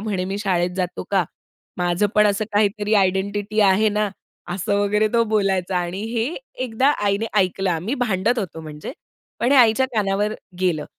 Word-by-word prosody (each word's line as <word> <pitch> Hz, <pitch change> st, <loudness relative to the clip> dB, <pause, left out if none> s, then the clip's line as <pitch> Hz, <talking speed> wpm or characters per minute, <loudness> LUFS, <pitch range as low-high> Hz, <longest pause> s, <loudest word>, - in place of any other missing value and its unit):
म्हणे 200 Hz, -4 st, -2 dB
मी 200 Hz, -, -3 dB
शाळेत 180 Hz, -4 st, 0 dB
जातो 180 Hz, -1 st, -3 dB
का? 190 Hz, -3 st, +2 dB, 0.5 s
माझं 175 Hz, +3 st, +1 dB
पण 210 Hz, 0 st, +5 dB
असं 205 Hz, +1 st, +1 dB
काहीतरी 205 Hz, +1 st, +1 dB
आयडेंटिटी 200 Hz, +2 st, +1 dB
आहे 200 Hz, +2 st, +4 dB
ना." 210 Hz, -, +1 dB, 0.5 s
असं 200 Hz, +1 st, -1 dB
वगैरे 210 Hz, +1 st, +2 dB
तो 230 Hz, 0 st, +4 dB
बोलायचा 190 Hz, -3 st, +1 dB
आणि 180 Hz, +2 st, -2 dB
हे 230 Hz, -1 st, 0 dB, 0.4 s
एकदा 255 Hz, +3 st, +2 dB
आईने 200 Hz, +2 st, +1 dB
ऐकलं 190 Hz, 0 st, +1 dB
आम्ही 180 Hz, -, -2 dB
भांडत 220 Hz, +3 st, 0 dB
होतो 170 Hz, -6 st, -4 dB
म्हणजे, 150 Hz, -1 st, -8 dB, 0.5 s
पण 245 Hz, -, +2 dB
हे -, -, +5 dB
आईच्या 240 Hz, +2 st, +5 dB
कानावर 210 Hz, 0 st, 0 dB, 0.3 s
गेलं 165 Hz, -5 st, 0 dB
200 Hz, 165 wpm, -21 LUFS, 185-215 Hz, 0.5 s, पण